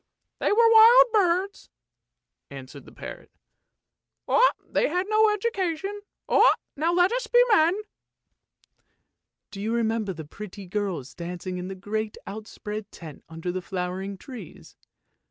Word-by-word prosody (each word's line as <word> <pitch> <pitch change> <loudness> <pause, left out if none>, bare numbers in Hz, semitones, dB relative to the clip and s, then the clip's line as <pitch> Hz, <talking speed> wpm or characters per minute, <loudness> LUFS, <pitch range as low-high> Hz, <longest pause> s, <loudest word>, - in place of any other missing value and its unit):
" - - -56
They - - +1
were 455 +2 +5
wild 465 +3 +9
birds," 385 -1 +1 0.8
answered 135 0 -11
the - - -14
parrot; - - -10 0.7
" - - -61 0.5
they - - +3
had 360 +4 -1
no 430 0 +4
education. 395 -2 -2 0.7
Now 320 +4 0
let 355 +2 +3
us - - -2
be 485 - +4
men! 355 0 +4 0.5
" - - -43
" - - -56
Do 200 -1 -8
you 220 +2 -2
remember 225 -3 0
the 160 -4 -8
pretty 200 +4 -10
girls 185 -8 -4
dancing 180 +1 -6
in 180 - -5
the 190 - -6
great 210 +3 -4
outspread 210 0 -7
tent 155 -4 -11
under 165 +2 -5
the 185 +1 -4
flowering 190 +2 -4
trees? 230 - -11
215 Hz, 140 wpm, -25 LUFS, -, 0.8 s, wild